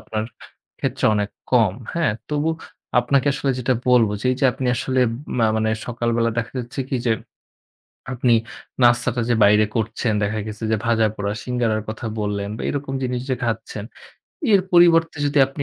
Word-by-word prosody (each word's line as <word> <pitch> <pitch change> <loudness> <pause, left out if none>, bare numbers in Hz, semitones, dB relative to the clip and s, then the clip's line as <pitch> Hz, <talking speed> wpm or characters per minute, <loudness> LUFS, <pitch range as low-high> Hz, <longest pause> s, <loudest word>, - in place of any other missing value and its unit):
আপনার 110 0 -4 0.5
ক্ষেত্রে - - -2
অনেক 105 -1 -1 0.2
কম, 115 -7 +4 0.2
হ্যাঁ? 165 -9 +1 0.2
তবু 150 +2 0 0.5
আপনাকে 135 +3 +1
আসলে 135 0 -1
যেটা 125 +1 +1
বলব 125 -3 +5
যে - - -2
এই 130 - -3
যে - - +2
আপনি 130 - -4
আসলে 130 +1 0 0.4
মা 115 - +4
মানে 110 0 +1 0.2
সকালবেলা 120 -1 0
দেখা 115 +1 -3
যাচ্ছে 125 +2 -5
কি 135 - -1
যে 115 - +4 1.0
আপনি 120 -1 +2 0.5
নাস্তাটা 120 0 +3
যে 120 - +3
বাইরে 105 +1 +5
করছেন, 110 0 -1
দেখা 110 +2 -1
গেছে 110 +1 -7
যে 110 - +2
ভাজাপোড়া, 110 -3 +1
সিঙ্গাড়ার 120 -3 0
কথা 110 +2 -6
বললেন 105 -1 -2
বা - - -6
এরকম 140 -1 -3
জিনিস 125 -1 -2
যে 130 - +1
খাচ্ছেন, 110 -2 -3 0.7
এর 195 - +6
পরিবর্তে 165 -2 +5
যদি 145 +1 +1
আপনি 135 +2 -6
120 Hz, 165 wpm, -21 LUFS, 110-130 Hz, 1.0 s, এর